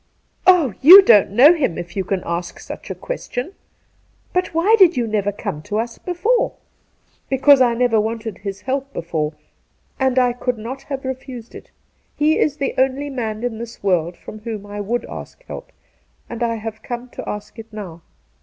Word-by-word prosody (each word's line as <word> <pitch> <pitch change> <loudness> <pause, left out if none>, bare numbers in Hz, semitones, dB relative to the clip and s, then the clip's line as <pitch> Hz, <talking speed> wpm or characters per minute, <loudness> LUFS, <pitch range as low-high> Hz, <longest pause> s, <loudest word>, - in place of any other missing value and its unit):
' - - -45
Oh, 340 - +5
you 370 +8 +11
don't 210 - +6
know 255 - +7
him 270 - -1
if 175 0 -7
you 195 - -1
can 185 0 -2
ask 170 +1 -4
such - - -9
a - - -4
question. 375 - -5 0.8
But 365 0 0
why 345 +7 +4
did 355 -6 +6
you 240 - +1
never 210 -2 0
come 150 -6 -5
to 210 +7 -4
us 230 +1 -3
before 465 +8 0 0.3
?' - - -42
' - - -39
Because 270 +1 +5
I 240 -2 +4
never 230 -3 +2
wanted 225 0 -4
his 200 0 -6
help 270 +3 -3
before, 160 -2 -2 0.7
and 265 -1 +1
I 250 -1 +4
could 245 0 -2
not 245 +5 -6
have 270 -1 -4
refused 260 -2 -7
it. - - -12 0.5
He 305 +2 +2
is 295 -1 +1
the 280 - -2
only 270 +2 0
man 225 -4 -4
in 235 -3 -3
this 230 -2 -9
world 175 -3 0
from 215 - -10
whom 215 -2 -6
I 205 0 -6
would 235 +4 -2
ask - - -10
help, - - -9 0.6
and 235 0 -7
I 230 -1 0
have 220 0 -7
come 240 +1 -6
to - - -7
ask 210 +2 -7
it 225 0 -11
now. 185 -6 -8
235 Hz, 195 wpm, -20 LUFS, 210-270 Hz, 0.8 s, you